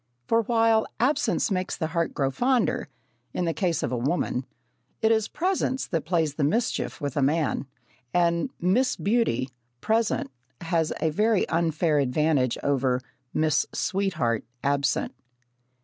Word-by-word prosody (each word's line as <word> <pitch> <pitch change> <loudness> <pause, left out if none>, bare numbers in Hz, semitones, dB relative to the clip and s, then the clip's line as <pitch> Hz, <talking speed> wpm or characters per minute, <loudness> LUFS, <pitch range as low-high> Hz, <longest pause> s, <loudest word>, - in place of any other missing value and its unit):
For 230 - +3
while 225 -1 +3
"absence 265 -2 +1
makes 185 -1 -1
the 160 - -1
heart 170 -1 0
grow 135 -1 +1
fonder" 250 - +1 0.5
in 180 - 0
the 165 - 0
case 175 -3 0
of - - -1
a - - 0
woman, 130 -1 -1 0.5
it 220 - +3
is 220 -1 +2
presence 330 -6 -1
that 165 -4 -2
plays 165 -4 +1
the 145 - -2
mischief 220 +12 0
with 145 -2 -3
a 145 - +1
man, 145 0 +1 0.4
and 170 +5 +2
Miss 220 +9 +2
Beauty 200 - +1 0.3
present 220 - 0 0.3
has 165 -1 0
a 160 - +2
very 210 +4 +2
unfair 160 -2 +1
advantage 140 -1 +1
over 130 -3 +1 0.3
Miss 155 -2 +1
Sweetheart 170 - 0 0.2
absent. 140 -1 +1
170 Hz, 140 wpm, -26 LUFS, 145-220 Hz, 0.5 s, For